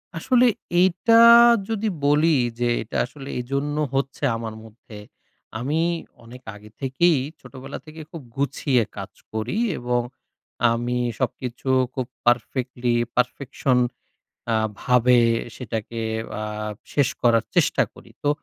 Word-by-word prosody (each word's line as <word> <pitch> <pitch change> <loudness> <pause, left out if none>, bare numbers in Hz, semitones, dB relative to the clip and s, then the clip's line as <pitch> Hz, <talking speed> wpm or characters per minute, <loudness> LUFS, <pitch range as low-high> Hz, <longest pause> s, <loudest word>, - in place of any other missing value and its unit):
আসলে 250 +8 +3 0.4
এইটা 190 +6 +4 0.5
যদি 220 -1 -1 0.2
বলি 150 +2 +4 0.2
যে 120 - +1
এইটা 110 - -5
আসলে 135 +2 -10
এইজন্য 140 +4 -2 0.2
হচ্ছে 135 +1 -2
আমার 115 -1 -6
মধ্যে। 110 -1 -14 0.6
আমি 145 +6 -1 0.4
অনেক 125 +2 -12
আগে 105 +1 -14
থেকেই 145 +4 +2 0.2
ছোটবেলা 135 +1 -9
থেকেই 155 0 -10
খুব 165 - -8
গুছিয়ে 135 -3 +1
কাজ - - -6 0.2
করি। 110 - -2 0.2
এবং 120 0 0 0.7
আমি 120 +1 -1 0.2
সবকিছু 125 +1 -3 0.2
খুব 130 -2 -2 0.2
পারফেক্টলি 120 0 0 0.2
পারফেকশন 130 +1 0 0.8
আ - - +2 0.3
ভাবে 125 0 +4 0.4
সেটাকে 115 -1 -5 0.4
আ - - -3 0.5
শেষ 145 -4 +2
করার 115 -2 +4
চেষ্টা - - +3
করি। - - -16
তো 145 - 0
130 Hz, 115 wpm, -23 LUFS, 120-145 Hz, 0.8 s, এইটা